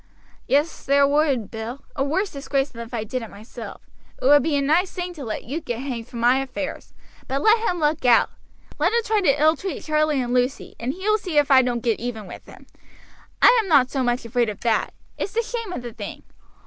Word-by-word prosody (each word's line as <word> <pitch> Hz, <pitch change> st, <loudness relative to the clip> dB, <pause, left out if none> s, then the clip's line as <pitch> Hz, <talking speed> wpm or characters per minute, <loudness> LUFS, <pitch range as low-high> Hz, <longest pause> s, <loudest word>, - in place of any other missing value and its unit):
"Yes, 295 Hz, +4 st, +1 dB
there 280 Hz, 0 st, +4 dB
would, 280 Hz, -6 st, +1 dB
Bill 230 Hz, +4 st, -6 dB
a 270 Hz, -, 0 dB
worse 370 Hz, +9 st, -1 dB
disgrace 275 Hz, 0 st, -1 dB
than 235 Hz, -, -9 dB
if 230 Hz, -, -9 dB
I 230 Hz, -3 st, -2 dB
did 250 Hz, +4 st, -4 dB
it 225 Hz, -, -8 dB
myself. 225 Hz, +3 st, -10 dB, 0.4 s
It -, -, -5 dB
would 290 Hz, +2 st, +7 dB
be 310 Hz, -2 st, 0 dB
a -, -, +1 dB
nice 335 Hz, +7 st, +2 dB
thing 360 Hz, -1 st, -5 dB
to 300 Hz, -5 st, -8 dB
let 220 Hz, -3 st, -4 dB
you 290 Hz, +8 st, -4 dB
get 240 Hz, -6 st, -4 dB
hanged 245 Hz, -3 st, -5 dB
for -, -, -14 dB
my 240 Hz, +3 st, +3 dB
affairs; 270 Hz, +2 st, -5 dB, 0.3 s
but 275 Hz, +2 st, -2 dB
let 440 Hz, +1 st, +5 dB
him 355 Hz, -, -2 dB
look 300 Hz, -1 st, +1 dB
out 240 Hz, -2 st, +5 dB, 0.5 s
let -, -, +3 dB
him 470 Hz, 0 st, +2 dB
try 430 Hz, -1 st, +2 dB
to 290 Hz, -6 st, +2 dB
ill 310 Hz, +2 st, +5 dB
treat 380 Hz, 0 st, -5 dB
Charlie 305 Hz, -2 st, +1 dB
and 245 Hz, -1 st, -2 dB
Lucy, 250 Hz, +2 st, 0 dB
and 245 Hz, +3 st, -2 dB
he 375 Hz, +5 st, -6 dB
will 430 Hz, 0 st, +3 dB
see 360 Hz, -7 st, -3 dB
if 290 Hz, -1 st, +3 dB
I 265 Hz, -1 st, +8 dB
don't 245 Hz, -2 st, -2 dB
get 230 Hz, -3 st, +1 dB
even 230 Hz, -3 st, -5 dB
with 180 Hz, -, -11 dB
him. -, -, -14 dB, 0.8 s
I -, -, +8 dB
am 420 Hz, -, -7 dB
not 260 Hz, -5 st, +5 dB
so 270 Hz, -, -1 dB
much 245 Hz, -1 st, 0 dB
afraid 235 Hz, 0 st, +1 dB
of 210 Hz, -, -7 dB
that 230 Hz, -2 st, 0 dB, 0.2 s
it's 395 Hz, -, -3 dB
the 465 Hz, -, +1 dB
shame 460 Hz, -3 st, -5 dB
of 255 Hz, -, -5 dB
the 240 Hz, -2 st, -7 dB
thing. 205 Hz, -3 st, -8 dB
275 Hz, 240 wpm, -23 LUFS, 240-315 Hz, 0.8 s, I